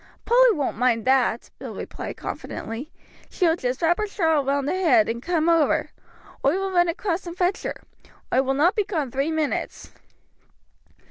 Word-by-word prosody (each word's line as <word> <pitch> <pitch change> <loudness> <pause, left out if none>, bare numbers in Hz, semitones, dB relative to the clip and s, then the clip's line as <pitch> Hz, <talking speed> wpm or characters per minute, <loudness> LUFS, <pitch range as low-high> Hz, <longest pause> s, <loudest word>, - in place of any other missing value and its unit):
"Polly - - +5
won't 285 - -2
mind 245 -2 +2
that," 255 -3 +2
Bill - - -7
replied - - -7
confidently. 235 +8 -6 0.4
"She 365 - 0
will 325 -1 +4
just 255 -2 -3
wrap 345 +3 +3
her 425 - -1
shawl 320 -7 +1
round 275 0 0
her - - 0
head 310 - +3
and 235 +1 -3
come 330 +1 0
over. 330 -3 +2 0.5
Oi 280 +5 +3
will 390 0 -2
run 350 -1 +3
across 350 +1 -2
and 345 +1 -7
fetch 365 +1 +1
her. - - -5 0.5
Oi 260 - +5
will 270 0 -1
not 340 +8 +3
be 420 - +2
gone 310 - -3
three 275 +5 -1
minutes." 315 -2 -3
320 Hz, 180 wpm, -24 LUFS, 265-355 Hz, 0.5 s, Polly